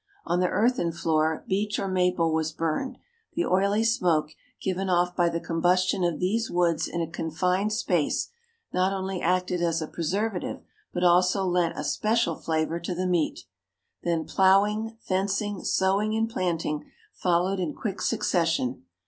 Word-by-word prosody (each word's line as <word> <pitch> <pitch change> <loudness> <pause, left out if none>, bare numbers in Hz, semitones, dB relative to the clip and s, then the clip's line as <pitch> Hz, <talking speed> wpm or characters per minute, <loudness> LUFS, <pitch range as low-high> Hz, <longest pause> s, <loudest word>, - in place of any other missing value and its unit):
On 175 - +1
the 180 - +3
earthen 230 -6 +1
floor 160 -1 0
beech 205 +2 0
or 195 - -2
maple 180 -3 +1
was 160 0 0
burned; 165 - -2 0.4
the 345 - +1
oily 200 +4 +2
smoke, 170 -9 +2 0.3
given 190 0 -2
off 180 0 +2
by 175 -1 +3
the 170 0 -2
combustion 180 +3 +1
of 170 -3 0
these 220 +5 0
woods 175 -2 +1
in 170 - -3
a 165 - -1
confined 180 +6 0
space, 180 -8 0 0.4
not 185 +1 +2
only 190 -1 -3
acted 180 0 +1
as 165 -1 +1
a 160 - -2
preservative 190 +5 -2 0.3
but 175 - -2
also 180 +2 +4
lent 175 -2 +1
a - - -3
special 215 -6 +1
flavour 160 +1 -1
to 175 +1 -4
the 185 +1 -1
meat. 175 -4 0 0.6
Then 170 -2 -1
ploughing, 210 +4 +3
fencing, 200 +2 -1
sowing, 200 +3 +1
and 225 0 +1
planting 170 -9 -2 0.3
followed 180 +2 +1
in 170 -5 -2
quick 200 -4 -4
succession. 165 - 0
180 Hz, 155 wpm, -26 LUFS, 170-195 Hz, 0.6 s, also